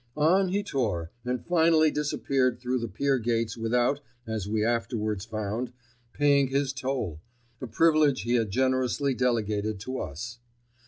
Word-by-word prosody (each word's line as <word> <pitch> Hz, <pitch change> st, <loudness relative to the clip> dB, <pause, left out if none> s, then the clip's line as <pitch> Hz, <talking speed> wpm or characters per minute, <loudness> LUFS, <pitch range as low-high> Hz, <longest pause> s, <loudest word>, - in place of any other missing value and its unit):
On 180 Hz, +6 st, +4 dB
he 200 Hz, +3 st, 0 dB
tore, 105 Hz, -, -2 dB
and 125 Hz, -1 st, -3 dB
finally 160 Hz, -2 st, +4 dB
disappeared 135 Hz, -4 st, 0 dB
through 125 Hz, +1 st, -1 dB
the 115 Hz, -, -3 dB
pier 135 Hz, +6 st, 0 dB
gates 115 Hz, -1 st, -1 dB
without, 120 Hz, +4 st, +1 dB, 0.3 s
as 110 Hz, -3 st, -3 dB
we 110 Hz, 0 st, +1 dB
afterwards 110 Hz, -4 st, -1 dB
found, 110 Hz, +3 st, -3 dB, 0.4 s
paying 140 Hz, -2 st, +3 dB
his 135 Hz, 0 st, 0 dB
toll, 130 Hz, -, -3 dB, 0.4 s
a 130 Hz, -, -4 dB
privilege 150 Hz, +3 st, +3 dB
he 120 Hz, -, 0 dB
had 115 Hz, -3 st, +2 dB
generously 130 Hz, +3 st, +1 dB
delegated 110 Hz, -4 st, 0 dB
to 130 Hz, +4 st, -4 dB
us. 115 Hz, -, -6 dB
125 Hz, 145 wpm, -27 LUFS, 110-140 Hz, 0.4 s, On